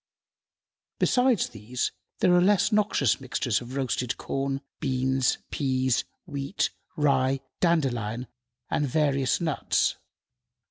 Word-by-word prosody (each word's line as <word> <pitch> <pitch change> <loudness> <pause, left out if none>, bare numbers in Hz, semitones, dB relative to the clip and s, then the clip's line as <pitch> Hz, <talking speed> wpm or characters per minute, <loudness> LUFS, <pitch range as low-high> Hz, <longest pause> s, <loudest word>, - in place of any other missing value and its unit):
Besides 250 -5 +3
these, 115 +3 -3 0.3
are 180 -1 +6
less 200 +3 +4
noxious 205 - +2
mixtures 125 -3 -1
of 125 +2 -8
roasted 130 -3 -1
corn, 135 0 -2 0.2
beans, 130 -1 +1
peas, 130 -3 +1 0.2
wheat, 140 0 -2 0.2
rye, 135 -3 +2 0.2
dandelion, 125 - +1 0.5
and 145 - +1
various 140 -2 +1
nuts. 160 -5 +1
135 Hz, 95 wpm, -27 LUFS, 130-155 Hz, 0.5 s, are